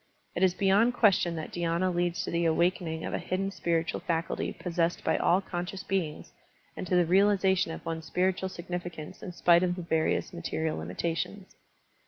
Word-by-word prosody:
It - - -3
is 185 -1 +4
beyond 200 +6 +3
question 195 -7 +3
that 160 -1 -5
dhy^na 175 +1 0
leads 175 0 0
to - - -4
the 170 0 +1
awakening 165 0 +1
of - - -4
a - - 0
hidden 195 +2 -2
spiritual 170 -3 -1
faculty 165 -1 -2
pos 180 - -6
sessed 170 0 +1
by - - +2
all 180 +3 +3
conscious 185 +1 -5
beings 180 -6 -3 0.4
and - - -5
to 180 - +1
the 175 -1 +4
reali 195 +3 +4
zation 190 -3 +2
of - - -8
one's 165 -1 -4
spiritual 190 +2 0
significance 175 -2 -6
in 180 - -6
spite 175 0 +4
of 180 -1 +1
the 180 - -6
various 160 +1 0
material 160 - -2
limitations. 165 - -4
175 Hz, 185 wpm, -29 LUFS, 165-190 Hz, 0.4 s, is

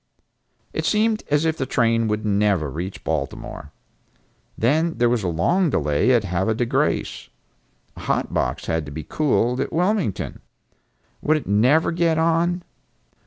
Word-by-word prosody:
It - - -2
seemed 215 0 +1
as 145 +2 +2
if 160 0 0
the 130 - -2
train 115 -2 +2
would 105 0 -2
never 100 -7 +1
reach 90 +6 -6
Baltimore. 75 -1 -4 0.9
Then 155 +7 +1
there 120 0 +3
was 120 -2 +1
a 95 - -2
long 160 - +1
delay 75 - +1
at 120 -4 +3
Havre 95 +4 0
de 120 - 0
Grace. 115 - -1 0.7
A - - -11
hot - - -1
box 60 - -1
had 80 -1 -1
to - - -7
be 80 +2 -6
cooled 125 -4 0
at - - -2
Wilmington. 180 - -1 0.8
Would 155 +1 +2
it 155 - -6
never 125 +12 +3
get 165 -1 +1
on? 170 +2 +1
120 Hz, 155 wpm, -22 LUFS, 95-160 Hz, 0.9 s, there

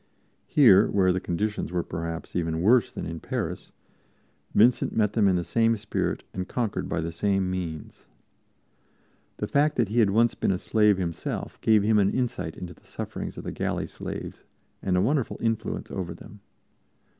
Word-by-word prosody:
Here, 110 -9 +6
where 95 -2 +3
the 90 - 0
conditions 105 +3 -2
were 90 -1 0
perhaps 85 0 -5
even 80 -1 -1
worse 120 +3 +4
than - - -6
in 80 0 -5
Paris, 95 - -4 0.8
Vincent 120 +3 +4
met 105 -2 +2
them 105 -3 +3
in 95 - +3
the 90 - 0
same 115 +6 +2
spirit 105 +1 -2
and 95 0 -4
conquered 115 -5 -2
by 85 - -1
the 85 +1 -3
same 95 +1 0
means. 85 -4 -6 1.3
The - - -2
fact 150 +1 +2
that 115 -5 +1
he 115 +3 +1
had 110 -4 +5
once 115 +3 +3
been - - 0
a 95 - 0
slave 105 0 +3
himself 85 -3 -4
gave 110 -2 +4
him 105 0 +4
an 100 -1 +3
insight 120 -11 -2
into 90 -1 -7
the - - -25
sufferings - - -6
of - - -6
the - - -4
galley - - -2
slaves - - -7 0.4
and 90 -2 +1
a - - +3
wonderful 135 +4 0
influence 115 -1 -2
over 85 -4 -4
them. 105 +4 -13
100 Hz, 180 wpm, -26 LUFS, 90-115 Hz, 1.3 s, Here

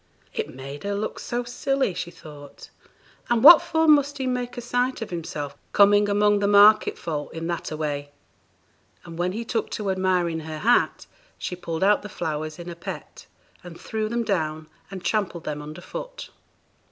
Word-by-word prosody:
'It - - -3
made 135 +2 -8
her 200 0 -2
look 210 +2 -4
so 240 +1 -3
silly,' 270 -2 -1
she 175 - -4
thought; 150 -4 -13 0.6
and 240 -1 +2
'what 320 +3 +11
for 320 0 +1
must 290 -2 +4
he 265 - -3
make 250 -1 -3
a - - -2
sight 245 +2 -1
of 225 - -6
himself, 150 -4 -5 0.2
coming 205 0 +5
among 205 0 +3
the 200 - +1
market 205 +1 +6
folk 150 -3 -4
in 165 0 -4
that 170 0 -3
a 155 - -5
way'; 145 -2 -3 1.0
and 170 -1 -9
when 180 +1 0
he 225 +4 -5
took 225 -1 -2
to 205 -2 -2
admiring 180 -3 0
her 155 0 -6
hat, 235 +9 +2 0.3
she 180 - -4
pulled 170 -1 -4
out 205 +1 +4
the 210 - -8
flowers 155 -3 -4
in 175 0 -9
a 175 - -6
pet, 170 - -9 0.4
and 175 -2 -11
threw 215 -1 -3
them 235 +1 -1
down, 155 -7 -2 0.2
and 190 -2 -8
trampled 195 -6 -1
them 150 -1 -4
under 155 +3 -9
foot. - - -8
190 Hz, 185 wpm, -24 LUFS, 160-225 Hz, 1.0 s, what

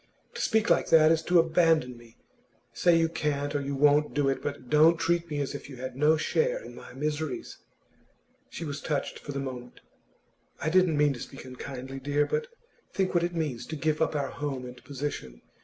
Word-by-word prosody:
To - - -5
speak 220 -1 +2
like - - +3
that 160 -1 +6
is 165 -1 +3
to 180 - +4
abandon 165 -5 +3
me. 120 -1 -17 0.6
Say 175 -2 +4
you 165 0 +3
can't 145 -3 -2
or 145 - 0
won't 150 +2 +3
do 145 -2 +2
it, 135 - -1
but 140 -3 -5
don't 155 +4 +5
treat 170 +1 0
me 150 -1 -2
as 140 - -3
if 140 - -8
you 135 - -8
had 130 0 -6
no 150 +3 +4
share - - +1
in - - -10
my - - -12
miseries!' 155 - -3 0.9
She 170 - -6
was 145 -1 -5
touched 145 -3 -2
for 145 - -7
the 140 - -3
moment. 125 -2 -7 0.8
'I - - -1
didn't 180 -3 +4
mean 145 -1 +3
to 125 - -9
speak 135 - -9
unkindly, 130 +1 -7
dear. 145 +2 +1
But 465 - -2 0.4
think 190 -1 0
what 175 -1 +2
it 175 0 -2
means, 150 -8 -3
to 160 - -5
give 155 0 -1
up 160 - +1
our 140 -2 -1
home 140 -3 -4
and 125 0 -11
position. 135 - -6
150 Hz, 205 wpm, -28 LUFS, 135-165 Hz, 0.9 s, that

